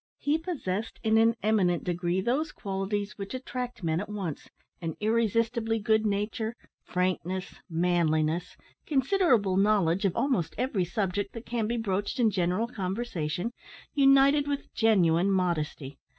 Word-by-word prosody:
He 295 +2 +1
possessed 230 - -4
in 220 0 +4
an 225 +1 +4
eminent 195 -5 +2
degree 175 +1 -1
those 275 +9 0
qualities 200 +1 -3
which 200 +5 -5
attract 250 -3 -5
men 160 0 +1
at 205 - -5
once, 195 -8 -5 0.3
and 165 -2 -3
irresistibly 225 +1 +1
good 220 0 +2
nature, 215 +3 -2 0.3
frankness, 185 +1 -2 0.2
manliness, 165 -1 +1 0.3
considerable 265 - +2
knowledge 195 -3 +3
of 190 - +1
almost 250 - 0
every 235 -8 0
subject 195 +2 -2
that 230 0 -8
can 230 -2 -1
be 235 +1 -1
broached 205 0 -2
in 225 -3 +4
general 185 +4 0
conversation, 190 -3 -3 0.4
united 275 +1 +5
with 285 -1 -4
genuine 190 -5 +3
modesty. 160 -7 -1
205 Hz, 135 wpm, -28 LUFS, 180-235 Hz, 0.4 s, united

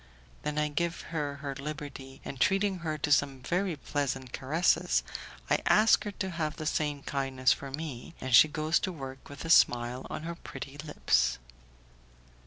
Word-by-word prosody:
Then 150 0 -3
I 150 0 +2
give 170 +3 -1
her 145 -3 -1
her 140 -1 -2
liberty, 140 -1 -7
and 135 - -6
treating 195 -1 +2
her 155 -2 -2
to 145 0 -2
some 140 -2 +3
very 180 -1 0
pleasant 135 -3 -3
caresses, 155 +7 +2 0.4
I - - +3
ask 215 +1 +5
her 205 - -3
to 190 -1 -3
have 155 -3 -2
the 155 - -6
same 150 -2 -1
kindness 135 -2 +1
for 140 - -8
me, 145 0 -6
and 130 -1 -4
she 135 - +9
goes 155 +2 +1
to 190 - -2
work 135 -5 -8
with 140 +2 -8
a 165 - 0
smile 120 -3 +4
on - - -5
her 170 +1 -4
pretty 145 -4 -9
lips. 65 - +1
145 Hz, 175 wpm, -30 LUFS, 135-165 Hz, 0.4 s, she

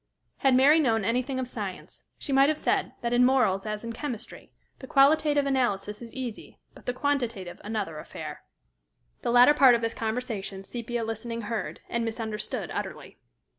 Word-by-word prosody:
Had 270 -2 +3
Mary 285 +5 +6
known 225 -8 +2
anything 250 +4 0
of 255 - -2
science, 205 -6 -7 0.2
she 280 - -4
might 270 +2 +6
have 310 - +1
said - - 0
that, 235 -1 -1
in 245 +1 +5
morals 245 -7 +3
as 215 0 -4
in 230 0 -5
chemistry, 245 -3 -7 0.3
the 265 - -9
qualitative 290 +1 +4
analysis 225 -6 0
is 230 -1 -9
easy, 250 -4 -6 0.2
but - - -17
the - - +2
quantitative 240 -10 -2
another 205 -7 -3
affair. - - -8 0.8
The - - -2
latter 245 +4 +7
part 265 -4 +7
of 235 - -1
this 230 0 -1
conversation, 220 -4 -3
Sepia 235 +2 -4
listening 225 +1 -4
heard, 225 0 -4
and 235 0 -1
misunderstood 225 -1 -4
utterly. - - -6
235 Hz, 170 wpm, -27 LUFS, 220-265 Hz, 0.8 s, latter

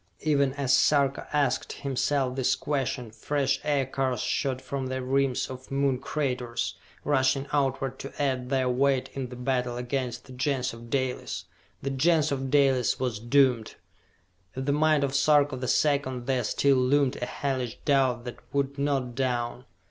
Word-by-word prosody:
Even 140 -3 +2
as 135 -2 0
Sarka 140 0 +3
asked 145 -2 0
himself 135 -1 -1
this 130 -2 +2
question 135 -5 -2
fresh 135 +4 0
Aircars 135 -3 0
shot 130 -2 -1
from 135 0 -4
the 130 0 -3
rims 135 0 +1
of 130 0 -9
Moon 135 -2 +1
craters, 125 -5 -2 0.3
rushing 135 -1 +2
outward 135 -2 0
to 135 - -8
add 130 -3 0
their 130 -1 +1
weight 130 +1 +1
in 130 -2 -4
the 125 - -8
battle 125 -1 -1
against 125 -1 -3
the 130 - -12
Gens 130 -1 -1
of 115 0 -11
Dalis. 130 0 -2 0.4
The 135 - -1
Gens 155 +2 +2
of 135 -1 -2
Dalis 135 -4 +3
was 125 -5 -2
doomed! 120 -1 +2 0.8
In 130 0 -3
the 140 - +1
mind 155 0 +3
of 135 -1 -1
Sarka 145 0 +4
the 130 0 -4
Second 135 -4 +1
there 130 -2 0
still 140 -1 +3
loomed 130 +1 +2
a 125 - -3
hellish 130 -5 -3
doubt 130 -4 +2
that 120 - -7
would 140 0 -1
not 135 -3 0
down. 125 -1 -2
135 Hz, 160 wpm, -27 LUFS, 125-140 Hz, 0.8 s, Sarka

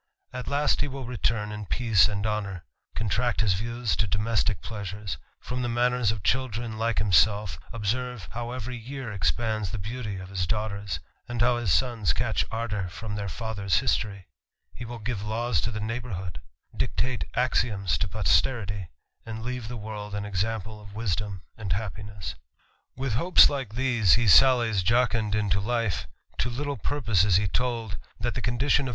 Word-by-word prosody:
At 125 0 -5
last 145 +1 +2
he 145 - +1
will 135 -2 -6
retire 115 -2 0
in 105 -1 -6
peace 110 -5 +4
and 105 0 -2
honour; 100 -5 -2 0.3
contract 115 +3 +1
his 105 -4 +4
views 115 +3 -1
to 105 - +2
domestick 105 -1 +1
pleasures; 100 -6 -5 0.2
form 125 0 -4
the 120 - -1
manners 120 -2 +2
of 110 -4 -5
children 120 -3 0
like 115 0 +1
himself; 100 -3 +3
observe 115 -2 -2
how 120 +1 -4
every 125 0 -4
year 125 +1 -6
expands 110 +2 0
the 110 - -4
beauty 105 0 -4
of 95 0 -8
his 90 -3 -1
daughters, 100 -4 -2 0.3
and 120 0 -4
how 120 +1 +4
his 120 -7 0
sons 115 - +2
catch - - +1
ardour 110 -4 -2
from 90 +5 -6
their 100 -1 -3
fiithei's 100 -2 -1
history; 100 -3 0 0.5
he 120 - -7
will 120 +1 -6
give 110 -1 -3
laws 110 -3 0
to - - -1
the 110 - -4
neighbourhood; 105 -5 -4 0.3
dictate 125 -2 -1
axioms 105 -8 +2
to 105 - +1
posterity; 100 - +1 0.4
and 110 0 -6
leave 125 -2 -4
the 120 +1 -5
world 105 -1 -6
an 105 0 -2
example 105 +2 -2
of 100 0 -12
wisdom 100 -3 -2
and 100 -5 -2
happiness. 105 -1 -5 0.6
With 130 -2 -2
hopes 170 +10 +7
like 130 -7 -4
these, 120 -7 +4
he 120 +1 +4
sallies 115 -2 +6
jocund 115 +1 +2
jntojife; 105 +1 0 0.3
to 120 - +1
little 140 +3 -3
purpose 115 -11 +2
is 100 -3 +4
he 100 +2 +4
told, 115 -1 -1 0.2
that - - 0
the - - -3
condition 135 +3 +2
pf. - - -2
110 Hz, 170 wpm, -27 LUFS, 100-120 Hz, 0.6 s, hopes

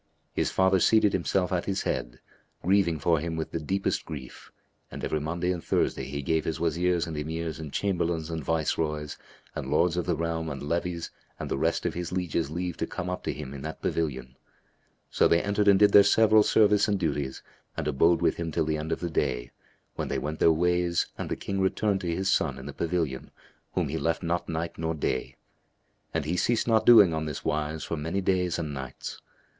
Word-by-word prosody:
His - - 0
father 95 0 +3
seated 105 +2 +4
himself 95 +1 0
at 90 -2 0
his 95 -1 -1
head, - - -3 0.4
grieving 95 -3 +3
for 80 +2 +2
him 80 +1 -3
with 80 -1 -4
the 85 - -2
deepest 95 +5 -1
grief, 70 -5 -9 0.4
and - - -8
every 75 - 0
Monday 85 +4 -1
and 85 -2 -4
Thursday - - 0
he 70 +1 -5
gave 80 +3 +1
his 80 0 -3
Wazirs 85 +1 +1
and 80 - -6
Emirs 80 +1 -4
and 75 -3 -7
Chamberlains 85 -4 -1
and 80 -2 -3
Viceroys 75 -1 -1 0.3
and - - -5
Lords 85 0 +2
of 90 - -1
the 85 - +2
realm 80 0 -2
and 70 -2 -6
levies 85 +2 -2 0.3
and - - -5
the - - 0
rest - - 0
of - - 0
his 85 -1 -4
lieges 85 -4 -1
leave 90 +2 -3
to - - -2
come 90 +1 -4
up 90 - -5
to - - 0
him 70 -2 -7
in 70 - -7
that 80 +2 -6
pavilion. 65 -5 -2 0.8
So - - +4
they 85 - +4
entered 100 0 +1
and 100 -1 +7
did 105 +1 +5
their 100 - +9
several 110 +2 +5
service 105 -1 +4
and 105 -1 +1
duties 75 -5 -2 0.3
and - - -2
abode 80 +4 +3
with - - +2
him 85 -1 -3
till 80 - 0
the 80 0 0
end 80 +1 -4
of - - -2
the 85 -2 -3
day, 65 -5 -1 0.5
when - - -2
they - - -1
went 75 +1 -4
their 80 - +6
ways 90 +1 +1
and - - -5
the - - -1
King 100 0 -3
returned 95 +1 +1
to 90 - -4
his 95 +2 -2
son 70 -8 +1
in 65 - -9
the 70 - -6
pavilion 80 -6 -2 0.5
whom - - +1
he 80 +3 -2
left 85 +2 -1
not 85 +1 -1
night 80 0 -3
nor 80 0 -1
day; 65 -4 -2 0.8
and 80 -3 -2
he 85 +4 -1
ceased 120 +5 +1
not 110 -2 +3
doing 105 -8 +8
on 80 0 -2
this 75 -2 -5
wise 75 +1 -1
for 85 - -3
many 80 +6 -2
days 90 -2 +1
and 75 -3 -3
nights. 65 -2 -7
85 Hz, 215 wpm, -27 LUFS, 75-90 Hz, 0.8 s, their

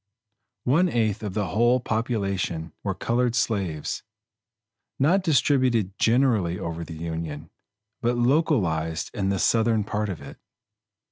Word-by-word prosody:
One 165 +8 +3
eighth 110 - 0
of 105 -3 -5
the 105 -5 -1
whole 120 +7 +3
population 100 -9 -2
were - - -2
colored 120 0 0
slaves, 95 -10 -1 1.0
not 170 +9 +3
distributed 130 - +2
generally 115 -8 +2
over 85 -1 -4
the 80 -1 -8
Union, 80 -2 -5 0.5
but 120 +1 +1
localized 110 - +1
in 95 -1 -1
the 100 - +1
Southern 110 +2 +2
part 105 +1 -2
of 90 - -4
it. 70 0 -11
110 Hz, 125 wpm, -25 LUFS, 85-120 Hz, 1.0 s, One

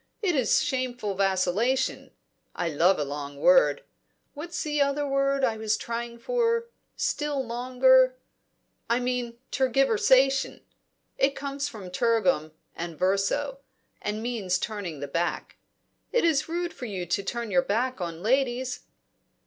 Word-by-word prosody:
It 360 -5 +2
is 260 -4 +3
shameful 250 -6 -2
vacillation 195 +7 0 0.5
I 175 - -1
love 170 +5 +3
a 150 - 0
long 145 0 -6
word 270 - +4 0.5
What's 330 +4 -5
the 295 -1 0
other 280 +1 +1
word 275 0 +1
I 230 -4 +2
was 220 -1 0
trying 235 0 -5
for? 465 - 0 0.3
still 290 -3 -1
longer 255 - +4 0.7
I 235 +1 +3
mean, 245 -1 -2
tergiversation! 270 - +3 0.6
it 275 +1 +3
comes 280 0 -3
from 200 -9 -9
tergum 185 -7 +1 0.2
and 170 -2 -6
verso, 200 - 0 0.4
and 210 +1 -3
means 215 -7 -1
turning 195 -9 -5
the 145 - -3
back. 170 +5 -2 0.5
It 480 - +2
is 320 -2 +2
rude 345 +1 -2
to 190 -7 -3
turn 235 +2 -4
your 180 -2 +4
back 235 +4 -1
on 170 0 -5
ladies." 255 +1 +1
245 Hz, 130 wpm, -27 LUFS, 195-275 Hz, 0.7 s, word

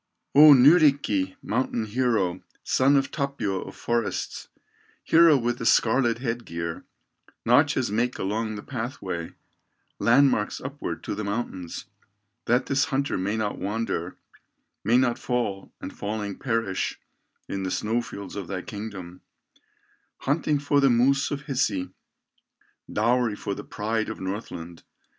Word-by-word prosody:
"O 150 +1 +10
Nyrikki, 135 - +4
mountain 115 -1 -1
hero, 110 -6 0 0.2
Son 135 +2 +3
of 135 0 0
Tapio 125 -10 -2
of - - -9
forests, 115 -5 -2 0.6
Hero 165 -2 +6
with 120 -1 -1
the 115 - -4
scarlet 120 0 +3
head 120 -1 -3
gear, 85 -2 -5 0.6
Notches 130 -1 +3
make 120 +4 0
along 110 +3 -2
the 105 - -7
pathway, 110 -10 -5 0.7
Landmarks 120 -3 +3
upward - - -6
to - - -3
the 105 +1 -4
mountains, 100 -5 -4 0.6
That 125 +2 +2
this 135 0 +2
hunter 140 -2 -1
may 100 +4 -1
not 105 -2 -2
wander, 100 -4 -3 0.7
May 115 +4 +4
not 125 -2 +2
fall, 120 -6 -2
and - - -8
falling 105 -1 -4
perish 115 -7 -1 0.5
In 100 - -3
the 95 - -2
snow 110 +5 0
fields 100 -4 -8
of 100 -4 -5
thy 95 -2 -4
kingdom, 100 -6 -8 1.0
Hunting 150 +1 +1
for 145 0 +1
the 135 -1 +5
moose 130 +3 +3
of 140 - -3
Hisi, 110 -10 -1 1.0
Dowry 115 0 +2
for 100 -1 -4
the - - -7
pride 110 +1 -2
of 110 - -6
Northland. 95 -4 -6
115 Hz, 135 wpm, -25 LUFS, 100-130 Hz, 1.0 s, O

